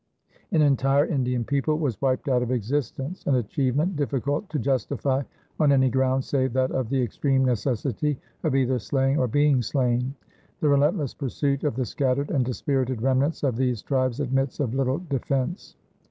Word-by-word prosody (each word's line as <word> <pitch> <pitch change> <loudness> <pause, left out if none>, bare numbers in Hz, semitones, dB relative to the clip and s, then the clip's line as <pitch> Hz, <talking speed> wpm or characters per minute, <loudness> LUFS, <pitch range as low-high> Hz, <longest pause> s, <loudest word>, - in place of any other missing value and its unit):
An 160 -5 +4
entire 140 0 +3
Indian 125 -6 0
people 140 +3 0
was 140 -9 -2
wiped 130 -1 0
out 125 -2 +2
of 125 - -2
existence, 135 - -2
an 140 - +3
achievement 135 - 0
difficult 145 - -1
to 155 - -2
justify 135 +1 0 0.4
on 150 -3 +4
any 130 -2 +4
ground 130 +1 +1
save 130 -3 0
that 130 0 +1
of 130 -4 -2
the 135 - +1
extreme 130 +3 +1
necessity 130 +4 -1 0.2
of 155 -5 0
either 130 -1 +2
slaying 135 +5 +1
or 125 - +2
being 145 +1 +3
slain. 125 +1 0 0.4
The 150 - +2
relentless 145 0 +2
pursuit 140 0 -2
of 150 -7 0
the 130 0 -1
scattered 135 +4 -1
and 135 - +2
dispirited 130 -1 -1
remnants 135 +5 +1
of 130 -5 +1
these 125 -4 0
tribes 130 -2 0
admits 135 -1 -1
of 125 -5 -1
little 135 0 +1
defense. 135 - -2
135 Hz, 170 wpm, -25 LUFS, 125-145 Hz, 0.4 s, An